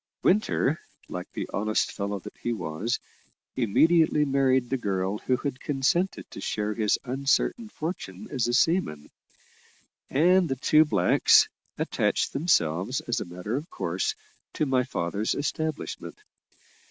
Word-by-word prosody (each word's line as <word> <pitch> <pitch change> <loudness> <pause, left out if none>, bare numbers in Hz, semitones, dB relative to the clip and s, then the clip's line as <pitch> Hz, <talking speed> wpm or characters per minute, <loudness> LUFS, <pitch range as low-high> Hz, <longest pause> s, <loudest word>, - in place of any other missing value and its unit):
Winter, 180 -6 +2 0.3
like - - -6
the - - -4
honest 110 +1 0
fellow 100 0 -3
that 95 - -10
he 120 - -1
was, 95 +4 -2 0.6
immediately 150 +6 +3
married 135 -2 +2
the 135 - +2
girl 100 -2 -1
who 130 - 0
had 140 -1 -4
consented 150 +7 0
to - - -8
share 105 0 -2
his 105 -1 +1
uncertain 140 - 0
fortune 180 +5 -6
as 130 -5 0
a 120 - -1
seaman: 130 - +1 1.0
and 175 +4 +4
the 135 - 0
two 155 +4 +4
blacks 100 - +4 0.3
attached - - 0
themselves, 105 - +1
as 120 - -2
a - - -4
matter 90 +6 -5
of 150 +6 -4
course, 430 - -2 0.4
to 155 - 0
my 130 -2 +2
father's 105 -3 -2
establishment. 155 +1 -3
130 Hz, 135 wpm, -27 LUFS, 105-155 Hz, 1.0 s, and